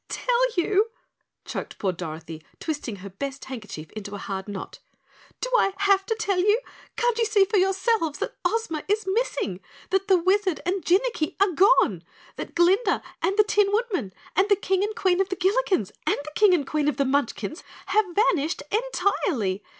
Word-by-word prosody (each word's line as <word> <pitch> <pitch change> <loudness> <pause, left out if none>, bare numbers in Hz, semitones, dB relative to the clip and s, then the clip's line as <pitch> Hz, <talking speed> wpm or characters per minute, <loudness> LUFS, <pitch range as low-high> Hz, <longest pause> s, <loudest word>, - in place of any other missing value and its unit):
"Tell - - +1
you!" 405 +5 +2 0.6
choked - - -6
poor 195 - 0
Dorothy, 160 -2 -7 0.2
twisting 290 -8 -4
her 200 +1 -9
best 275 +7 -6
handkerchief 215 -11 -8
into 205 -1 -7
a - - -5
hard 195 0 -5
knot. 200 -2 -7 0.6
"Do - - -3
I 390 -5 +3
have 395 -1 +3
to 450 - 0
tell 400 -4 0
you? 415 +5 +4 0.4
Can't 480 -1 +1
you 460 - +3
see 420 -3 +4
for 420 +2 0
yourselves 385 -4 +1
that - - -4
Ozma 445 -10 -1
is 415 +1 0
missing, 380 - -1 0.3
that 385 +1 +1
the 380 -2 +5
Wizard 375 0 +1
and 370 +1 -1
Jinnicky 375 -3 +1
are 400 -1 +4
gone, 335 - +4 0.3
that - - -7
Glinda 375 +6 +3 0.2
and 390 - 0
the 425 - +7
Tin 415 -1 +2
Woodman, 410 - -1 0.2
that 390 +2 +3
the 405 - +6
King 385 0 0
and 425 +1 -2
Queen 375 -1 +2
of 385 - -1
the 375 - -2
Gillikens 380 - +1 0.2
and - - +3
the 305 - -7
King 400 0 +5
and 290 -5 -1
Queen 300 0 -1
of 295 -4 0
the 280 - +2
Munchkins 265 - -1 0.2
have 430 0 +2
vanished 355 -6 +1
entirely! 360 - 0
375 Hz, 180 wpm, -25 LUFS, 275-415 Hz, 0.6 s, the